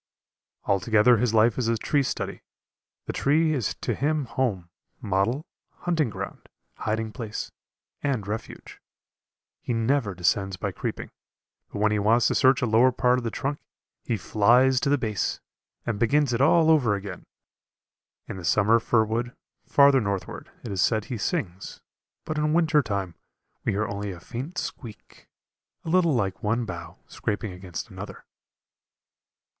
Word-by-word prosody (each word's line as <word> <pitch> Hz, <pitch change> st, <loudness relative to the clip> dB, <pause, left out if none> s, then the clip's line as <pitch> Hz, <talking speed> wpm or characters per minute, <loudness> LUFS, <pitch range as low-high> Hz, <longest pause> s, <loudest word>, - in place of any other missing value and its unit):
Altogether 105 Hz, +5 st, +4 dB
his 120 Hz, +1 st, +1 dB
life 115 Hz, +2 st, +3 dB
is 120 Hz, -, 0 dB
a 115 Hz, 0 st, +1 dB
tree 145 Hz, +6 st, +1 dB
study; 135 Hz, -, -3 dB, 0.6 s
the -, -, -4 dB
tree 155 Hz, +3 st, +2 dB
is 125 Hz, -9 st, -1 dB
to -, -, -1 dB
him 150 Hz, +1 st, 0 dB
home, 115 Hz, -9 st, -2 dB, 0.3 s
model, 105 Hz, -, 0 dB, 0.4 s
hunting 160 Hz, -7 st, +1 dB
ground, -, -, -7 dB, 0.3 s
hiding 110 Hz, 0 st, -2 dB
place, 110 Hz, -3 st, -6 dB, 0.5 s
and 130 Hz, -8 st, -1 dB
refuge. 105 Hz, +3 st, -7 dB, 0.8 s
He 120 Hz, -, -2 dB
never 115 Hz, -3 st, +1 dB
descends 95 Hz, +2 st, 0 dB
by -, -, -3 dB
creeping, -, -, -5 dB, 0.6 s
but -, -, -6 dB
when 105 Hz, +1 st, +2 dB
he 105 Hz, -, +1 dB
wants 110 Hz, +4 st, +3 dB
to -, -, +1 dB
search 130 Hz, 0 st, +4 dB
a -, -, +4 dB
lower 120 Hz, +3 st, +4 dB
part 125 Hz, 0 st, +2 dB
of -, -, -8 dB
the 115 Hz, -, -1 dB
trunk, 140 Hz, +5 st, -3 dB, 0.4 s
he 115 Hz, -, -1 dB
flies 120 Hz, +7 st, +4 dB
to 140 Hz, -, 0 dB
the 145 Hz, -, +4 dB
base, 110 Hz, -6 st, -2 dB, 0.5 s
and 110 Hz, -4 st, -2 dB
begins 135 Hz, +3 st, +2 dB
it 115 Hz, -, 0 dB
all 160 Hz, +3 st, +5 dB
over 125 Hz, -10 st, +3 dB
again. 95 Hz, -2 st, -7 dB, 1.0 s
In -, -, -6 dB
the 90 Hz, -, -8 dB
summer 110 Hz, +6 st, +4 dB
fir 115 Hz, 0 st, +2 dB
wood, 115 Hz, +3 st, -3 dB, 0.3 s
farther 140 Hz, -1 st, +5 dB
northward, 100 Hz, -3 st, -4 dB
it 115 Hz, -, -6 dB
is 95 Hz, -2 st, 0 dB
said 110 Hz, +1 st, +2 dB
he 125 Hz, -3 st, -4 dB
sings, 100 Hz, -, -3 dB, 0.5 s
but 155 Hz, -1 st, -2 dB
in 150 Hz, 0 st, +1 dB
winter 160 Hz, -2 st, +4 dB
time 100 Hz, -7 st, -3 dB, 0.5 s
we -, -, 0 dB
hear 105 Hz, +2 st, 0 dB
only 100 Hz, 0 st, -4 dB
a 90 Hz, -3 st, -7 dB
faint 130 Hz, -, -7 dB
squeak, 110 Hz, -6 st, -8 dB, 0.6 s
a -, -, -4 dB
little 170 Hz, -4 st, +3 dB
like 95 Hz, -5 st, -1 dB
one 115 Hz, +3 st, 0 dB
bough 85 Hz, -5 st, -8 dB
scraping 105 Hz, -1 st, -3 dB
against 90 Hz, -2 st, -7 dB
another. -, -, -9 dB
115 Hz, 160 wpm, -26 LUFS, 105-135 Hz, 1.0 s, all